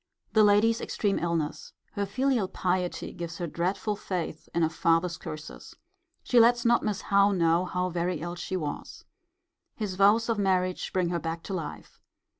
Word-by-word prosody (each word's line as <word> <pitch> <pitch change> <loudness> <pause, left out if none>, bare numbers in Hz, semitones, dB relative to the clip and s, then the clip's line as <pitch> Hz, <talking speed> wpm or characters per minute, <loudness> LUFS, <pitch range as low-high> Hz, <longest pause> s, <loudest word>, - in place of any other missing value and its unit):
The 220 -1 +6
lady's 210 +3 +4
extreme 200 -2 -1
illness. 165 -3 -2 0.2
Her 205 -2 -2
filial 250 -1 +1
piety 180 -1 -2
gives 170 -1 -6
her 175 - -3
dreadful 185 +6 -1
faith 180 -6 -5
in 170 - +1
a 160 - +3
father's 165 +1 +1
curses. 155 -1 -9 0.5
She 245 - +4
lets 240 +1 +5
not 235 0 +4
Miss 210 -2 -2
Howe 200 0 +3
know 170 0 +2
how 180 0 -1
very 175 +1 -1
ill 175 +2 -4
she 175 +2 -4
was. 150 -4 -6 0.7
His 210 -4 -3
vows 205 +4 +4
of 230 -3 0
marriage 185 -2 0
bring 180 -2 0
her 170 -1 -1
back 165 +1 -4
to 195 - -6
life. 165 -5 -6
185 Hz, 170 wpm, -28 LUFS, 170-205 Hz, 0.7 s, The